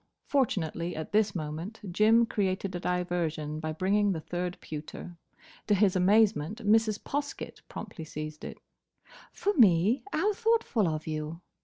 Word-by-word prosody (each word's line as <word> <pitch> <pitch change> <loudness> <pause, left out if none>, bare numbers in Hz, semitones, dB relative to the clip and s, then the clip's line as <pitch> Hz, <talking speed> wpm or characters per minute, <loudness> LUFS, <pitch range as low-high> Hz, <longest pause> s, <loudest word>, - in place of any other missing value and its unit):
Fortunately 175 - 0
at 155 - -5
this 210 -1 +2
moment 165 +6 -5
Jim 220 +5 +5
created 195 -3 -1
a 175 - -3
diversion 170 -4 -2
by 155 0 -3
bringing 195 +5 +2
the 165 - -3
third 175 +2 -4
pewter. 155 +3 -8 0.5
To 210 - +4
his 195 -1 +3
amazement 200 +1 +3
Mrs. 215 0 +4
Poskett 285 0 -4
promptly 160 - -7
seized 155 0 -7
it. - - -7 0.7
"For 410 - 0
me? 210 - +4
How 400 +7 +1
thoughtful 445 - +1
of 155 -1 -2
you!" 155 +1 -4
185 Hz, 140 wpm, -29 LUFS, 160-220 Hz, 0.7 s, Jim